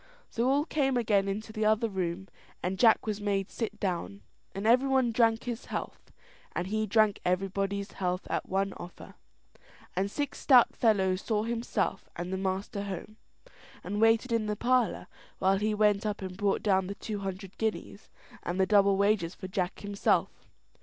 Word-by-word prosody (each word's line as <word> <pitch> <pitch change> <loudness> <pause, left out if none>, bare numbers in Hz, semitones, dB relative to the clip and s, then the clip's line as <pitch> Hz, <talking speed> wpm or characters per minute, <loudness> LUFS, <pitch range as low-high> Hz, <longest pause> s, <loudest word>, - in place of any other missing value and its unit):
So 235 +3 +1
all 285 +2 +2
came 270 -5 +1
again 205 -4 +2
into 215 +3 -4
the 215 0 -1
other 220 +2 +3
room, 190 -2 -3 0.4
and 185 +1 -2
Jack 225 -2 +5
was 210 -1 -3
made 200 -2 -1
sit 215 -2 -4
down, 105 - -3 0.3
and 195 +2 -4
everybody 255 +1 +4
drank 225 -1 +2
his 240 -1 -5
health, - - -6 0.4
and 175 - -1
he 215 +3 -1
drank 215 0 +3
everybody's 195 +2 -1
health 180 -1 -2
at - - -3
one 195 +1 0
offer. 175 - -10 0.8
And 190 +2 0
six 285 +7 -3
stout 255 -4 +5
fellows 190 -5 +2
saw 215 -2 0
himself 230 +1 -2
and 175 +2 -4
the - - -1
master 190 +1 -2
home, 200 +2 -7 0.7
and 205 +4 -3
waited 225 +2 +4
in 225 -2 +1
the 210 - -1
parlour 245 +1 +1 0.3
while 190 +1 +2
he 215 +1 0
went 210 -1 +3
up 210 -2 -3
and 185 -1 -6
brought 200 0 0
down 190 -3 +2
the 200 - -5
two 210 -1 -5
hundred 195 0 -6
guineas, 220 -1 -3 0.3
and 175 - -3
double 200 -2 +4
wages 200 -4 +1
for 185 - -7
Jack 185 -1 -3
himself. 205 -1 +1
205 Hz, 170 wpm, -29 LUFS, 190-225 Hz, 0.8 s, Jack